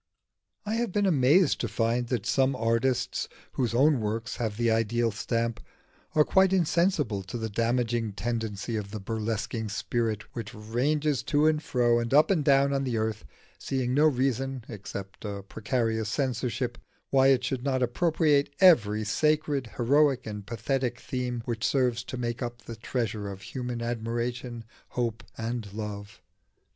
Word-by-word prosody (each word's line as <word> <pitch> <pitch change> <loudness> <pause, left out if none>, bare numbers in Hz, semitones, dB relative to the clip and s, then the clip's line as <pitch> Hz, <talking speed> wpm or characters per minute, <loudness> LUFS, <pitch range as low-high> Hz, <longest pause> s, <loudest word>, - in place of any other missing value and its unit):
I 210 - -2
have 235 -3 -1
been 205 +2 +1
amazed 160 +1 +4
to - - -1
find 120 +1 0
that 120 -5 -2
some 135 0 +2
artists 120 +2 0 0.2
whose 120 -3 -1
own 140 +2 +4
works 110 +1 -3
have 110 -3 -2
the 120 -1 +2
ideal 115 +1 +1
stamp, 115 +2 -2 0.6
are 155 - +6
quite 190 -1 +4
insensible 170 - +2
to 95 +5 -6
the 110 -2 -4
damaging 115 -1 0
tendency 110 0 -3
of 100 -2 -4
the 110 +1 -5
burlesquing 110 +1 -3
spirit 110 0 -1
which 115 0 -6
ranges 135 +6 0
to 145 +1 +2
and 155 -1 +3
fro 120 -4 +2
and 120 +3 0
up 150 +6 +6
and 165 -6 +2
down 140 0 +4
on 135 0 0
the 125 -4 -1
earth, 110 -6 -2 0.3
seeing 130 -2 -1
no 150 +3 +5
reason 135 -2 0
(except 100 -3 -8
a 100 -2 -5
precarious 110 +1 -1
censorship) 125 -1 -2 0.3
why 135 -1 +5
it 135 -2 +4
should 130 -2 -2
not 130 -2 +1
appropriate 145 +2 +2
every 110 - +5
sacred, 150 +3 +1
heroic, 135 +1 +3
and 105 -2 -6
pathetic 120 +2 -1
theme 125 -2 -3
which 115 -2 -3
serves 125 -3 +1
to 130 - -5
make 120 +1 -3
up 120 -1 -5
the 115 - -7
treasure 110 -2 -3
of 95 -1 -8
human 125 +1 -4
admiration, 120 +1 -3 0.2
hope, 115 -3 -2
and 115 -2 -4
love. 105 -1 -7
120 Hz, 155 wpm, -28 LUFS, 110-135 Hz, 0.6 s, are